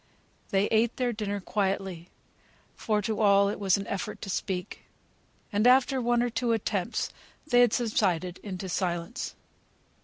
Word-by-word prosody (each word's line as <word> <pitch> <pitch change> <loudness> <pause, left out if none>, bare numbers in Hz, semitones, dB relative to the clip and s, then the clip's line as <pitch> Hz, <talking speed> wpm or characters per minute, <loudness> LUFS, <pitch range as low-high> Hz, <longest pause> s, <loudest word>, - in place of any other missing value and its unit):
They 195 +1 +2
ate 225 +1 +2
their 245 -2 0
dinner 205 -2 -3
quietly; 190 -3 -2 0.7
for 210 -2 0
to 220 +1 -1
all 200 -1 +5
it 205 - -4
was 195 -2 +3
an 200 - -5
effort 200 +2 -4
to 195 - -4
speak, 185 +1 -3 0.7
and 210 +4 +3
after 260 +1 +4
one 240 0 +2
or 245 - -1
two 235 0 0
attempts 210 -1 -1 0.3
they 245 -5 +3
had 245 -3 +5
subsided 185 -7 0
into 190 -2 -6
silence. 175 +4 -3
205 Hz, 150 wpm, -28 LUFS, 190-235 Hz, 0.7 s, all